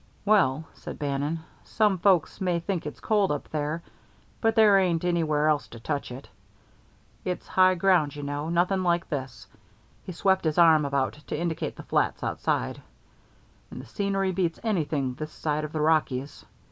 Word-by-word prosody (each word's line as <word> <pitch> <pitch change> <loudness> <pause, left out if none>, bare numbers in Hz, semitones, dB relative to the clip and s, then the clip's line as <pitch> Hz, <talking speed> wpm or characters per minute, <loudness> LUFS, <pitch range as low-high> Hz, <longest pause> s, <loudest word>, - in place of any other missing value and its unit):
"Well," 160 -9 +3
said - - -9
Bannon, 145 +3 -2 0.2
"some 210 -4 +1
folks 185 0 +2
may 180 -2 +1
think 170 -2 -3
it's 150 - -8
cold 205 -5 +1
up 145 - -4
there, 155 +2 -3 0.6
but 225 -1 +2
there 210 -3 +6
ain't 175 -3 +1
anywhere 155 -4 +1
else 150 -2 +1
to 115 - -11
touch 145 +4 -3
it. 130 +3 -9 1.0
It's 180 -1 -4
high 185 0 +4
ground, 175 -6 +2
you 145 - -6
know 145 +2 -3
nothing 180 +3 +1
like 175 -1 0
this" 135 -5 -5 0.6
he - - -7
swept 190 +2 +1
his 155 -1 0
arm 160 -3 +6
about 140 -1 0
to - - -3
indicate 170 -1 -3
the - - -10
flats - - 0
outside - - -2 0.9
"and - - -9
the - - -9
scenery 195 -2 -1
beats 175 -3 -1
anything 155 - -1
this 155 +4 -7
side 155 -1 -2
of 150 - -7
the 155 - -2
Rockies. 150 -3 0
165 Hz, 170 wpm, -26 LUFS, 145-185 Hz, 1.0 s, there